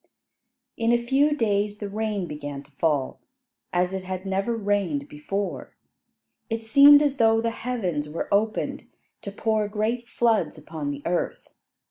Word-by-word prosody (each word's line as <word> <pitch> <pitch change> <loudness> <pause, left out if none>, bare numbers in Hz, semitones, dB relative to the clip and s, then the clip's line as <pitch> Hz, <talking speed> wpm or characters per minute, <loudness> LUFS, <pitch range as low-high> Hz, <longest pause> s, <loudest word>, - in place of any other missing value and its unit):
In 230 0 +2
a 240 - +5
few 270 +5 +2
days 205 -3 0
the 210 - -5
rain 210 -2 -2
began 145 -3 -6
to 140 - -23
fall, 145 -2 -1 0.5
as 180 +1 +1
it 190 -1 -3
had 185 0 -5
never 195 +4 -1
rained 200 -9 -1
before. 195 +8 -4 0.7
It 225 0 -3
seemed 285 +5 +8
as 285 -2 0
though 225 -1 +4
the 230 0 0
heavens 185 -12 -3
were 160 - -4
opened 215 +2 -1 0.3
to 200 - -6
pour 215 +1 0
great 225 +3 -2
floods 230 -7 +1
upon 155 -1 -5
the 145 0 -5
earth. 175 +1 -2
205 Hz, 150 wpm, -25 LUFS, 170-225 Hz, 0.7 s, seemed